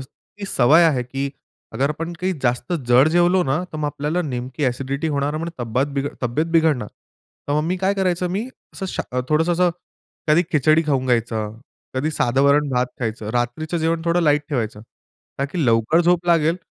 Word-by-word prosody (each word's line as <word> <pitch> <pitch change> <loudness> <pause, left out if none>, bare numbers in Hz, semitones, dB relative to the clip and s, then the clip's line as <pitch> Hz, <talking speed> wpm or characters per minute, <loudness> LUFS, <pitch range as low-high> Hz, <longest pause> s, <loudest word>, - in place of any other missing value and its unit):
इतकी 200 +9 -11
सवय 155 +3 +5
आहे 140 -6 +2
की 135 +3 -3 0.4
अगर 140 +2 0
आपण 165 +3 -4
काही 185 +1 0
जास्त 125 +7 0 0.2
जड 125 +5 +6
जेवलो 175 +2 +3
ना, 140 +6 0
तर - - -5
मग 150 - -2
आपल्याला 150 +5 -2
नेमकी 130 0 -4
ॲसिडिटी 135 +4 -1
होणार, 145 +1 -1
म्हणून 165 +2 -3
तब्बात 120 +4 0 0.4
तब्येत 125 +7 0
बिघडणार, 150 -9 +2 0.6
तर - - +1
मग 150 - +2
मी 180 +2 0
काय 190 +2 +1
करायचं 180 -2 0
मी 210 +7 -2 0.3
असं 190 - -5
शा 125 -7 -3
थोडंसं 160 +3 +2
असं 175 +1 +3 0.6
कधी 155 +3 +5
खिचडी 155 +2 +4
खाऊन 135 -3 0
घ्यायचं, 115 -3 -1 0.4
कधी 145 +5 0
साध 120 +2 +1
वरण-भात 140 -2 +3
खायचं, 110 -2 -3
रात्रीचं 155 +8 -2
जेवण 165 0 0
थोडं 170 +1 +2
लाईट 150 -1 +3
ठेवायचं. 115 -7 -2 0.6
का 140 - 0
की 155 +2 -2
लवकर 115 +8 +3
झोप 175 0 +2
लागेल 165 0 +3
150 Hz, 175 wpm, -21 LUFS, 125-170 Hz, 0.6 s, जड